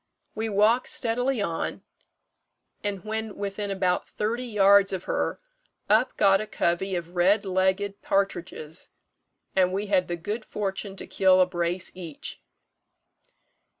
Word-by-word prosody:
We 220 +1 -2
walked 215 +5 +3
steadily 245 0 0
on; 165 -4 -3 1.0
and 200 -2 -3
when 220 0 -3
within 200 0 -4
about 190 -2 0
thirty 235 +4 -2
yards 200 -2 +5
of 185 -2 -3
her, - - -1 0.5
up 220 +4 +3
got 195 -1 +5
a 215 - -5
covey 185 +2 0
of 170 -1 -4
red 190 +5 +3
legged 190 +2 0
partridges, 175 -5 -2 0.7
and 185 -1 +4
we 200 +2 -2
had 185 -1 +3
the 175 - -2
good 210 +7 -4
fortune 195 -1 -4
to - - -7
kill 185 -1 +4
a 185 - +6
brace 175 0 -2
each. 170 -5 -7
195 Hz, 135 wpm, -26 LUFS, 185-210 Hz, 1.0 s, a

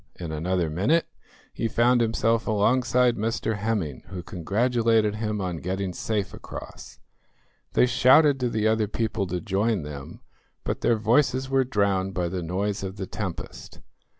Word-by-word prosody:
In 85 -3 -6
another 85 +3 0
minute 105 - +1 0.5
he 115 - -1
found 120 +2 +3
himself 115 0 +1
alongside 120 +3 +2
Mr 110 0 -1
Hemming, 105 - -2
who 95 -3 -7
congratulated 110 +4 +1
him 105 -1 -2
on 90 -3 -3
getting 95 +2 -3
safe 105 0 -2
across. 65 +2 -10 0.8
They - - +5
shouted 135 +3 +5
to 125 -1 0
the 110 -2 0
other 110 -1 +2
people 110 -2 -2
to 90 0 -2
join 100 -1 0
them, 70 -2 -8 0.4
but - - -3
their 120 - +3
voices 130 +4 +2
were 135 0 +4
drowned 100 -5 0
by 90 -2 -1
the 90 0 -3
noise 95 +5 -2
of 95 0 -5
the 95 - -4
tempest. 95 -2 -7
105 Hz, 150 wpm, -25 LUFS, 95-115 Hz, 0.8 s, They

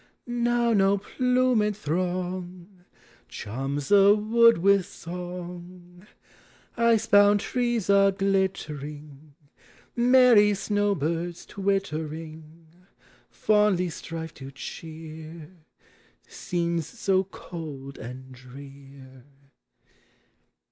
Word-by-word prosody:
Now 240 -1 +1
no 195 -1 +3
plumed 250 -1 +1
throng 180 +1 -4 0.4
Charms 135 +6 -5
the 200 0 +6
wood 230 +2 +4
with 195 +1 +3
song; 180 +1 -9 0.7
lee 235 -1 +3
bound 205 0 +6
trees 240 -4 -1
are 200 0 +5
glittering; 150 -7 -3 0.6
Merry 240 -4 +5
snow 205 +1 0
birds, 170 +2 -3
twittering, 160 -4 -4 0.6
Fondly 210 -5 +1
strive 160 0 -7
to 135 -1 -10
cheer 160 +3 -9 0.8
Scenes 170 -2 -3
so 195 -5 0
cold 150 -7 -9
and 130 +2 -9
drear. 135 0 -14
180 Hz, 80 wpm, -26 LUFS, 155-205 Hz, 0.8 s, the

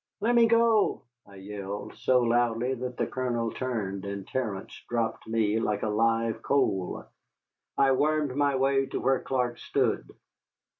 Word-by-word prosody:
"Let 225 +4 +1
me 235 -1 +6
go," 230 -5 +3 0.2
I 100 - -15
yelled, 100 +1 -6
so 125 +3 +2
loudly 120 +1 +1
that 125 -1 -5
the - - +1
Colonel 120 -3 -2
turned, 105 -7 -3
and 100 -1 -5
Terence 110 -7 -3 0.2
dropped 115 -2 -2
me 110 -1 +1
like 105 -2 -1
a 110 - 0
live 115 +1 +1
coal. 100 -10 0 0.7
I 135 -1 +4
wormed 150 0 +1
my 145 -1 +2
way 135 0 +2
to - - -3
where 135 +1 +2
Clark 125 -2 -2
stood. - - 0
120 Hz, 150 wpm, -28 LUFS, 105-135 Hz, 0.7 s, me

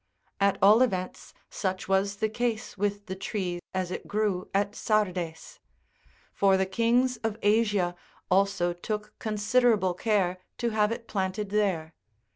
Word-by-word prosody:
At 200 0 +3
all 210 +4 +7
events, 185 -7 -1 0.2
such 190 0 -3
was 195 +1 +1
the 220 +2 0
case 230 +1 -2
with 205 0 -2
the 190 - -5
tree 190 -2 -3
as 185 -1 -2
it - - -5
grew 205 -3 -1
at 200 +1 0
Sardes: 185 -7 -1 0.7
for 195 -1 +4
the 190 - +1
kings 235 +5 +2
of 220 -1 -3
Asia 205 -4 +2 0.4
also 185 -2 +2
took 210 +4 -5
con 215 -1 -3
siderable 210 -3 +3
care 185 -3 +1 0.2
to 235 -1 -1
have 215 0 +2
it 230 0 -5
planted 195 0 -2
there. 185 -7 0
205 Hz, 145 wpm, -28 LUFS, 185-215 Hz, 0.7 s, all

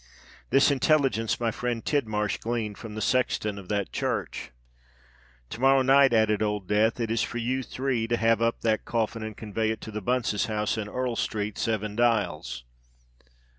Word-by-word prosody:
This 135 +3 +5
intelligence 135 -5 +2
my 115 -1 0
friend 120 0 -3
Tidmarsh 110 -8 0
gleaned 115 -3 -3
from 110 -2 -8
the 110 - -2
sexton 110 -5 0
of 95 - -12
that 100 -2 -1
church. - - -3 1.0
To 120 - -6
morrow 135 0 +5
night," 135 0 +6
added 110 -2 +3
Old 105 -3 -1
Death, 110 +3 +2
"it 115 -1 -1
is 115 -1 +1
for - - -3
you 125 +3 -1
three 125 -3 -2
to 120 0 +1
have 115 0 +2
up 115 0 0
that 110 -1 +1
coffin 115 -1 -1
and 110 -1 -6
convey 110 0 -2
it 110 0 -2
to 110 - -7
the 105 0 -4
Bunces' 120 -2 0
house 105 -1 -1
in 105 -2 -4
Earl 125 +1 -2
Street, 105 -1 -2
Seven 105 -2 -1
Dials." 100 - 0
115 Hz, 175 wpm, -27 LUFS, 105-120 Hz, 1.0 s, night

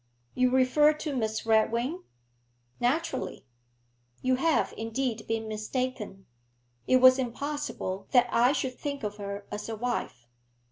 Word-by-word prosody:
'You 255 0 +3
refer 260 +4 +4
to 305 -1 -4
Miss 220 -3 -2
Redwing?' 235 +9 +2 0.8
'Naturally.' 260 - -1 0.8
'You 255 0 +2
have, 325 +3 +1
indeed, 225 0 -3
been 225 0 -2
mistaken. 215 -2 -4 0.6
It 255 - +5
was 255 +1 +7
impossible 255 -7 -3
that 245 -2 +5
I 240 +2 +4
should 260 -3 -2
think 280 -3 -4
of 210 0 -4
her 200 0 -6
as 210 +2 -5
a 225 - -3
wife. 225 - -3
245 Hz, 130 wpm, -28 LUFS, 220-265 Hz, 0.8 s, was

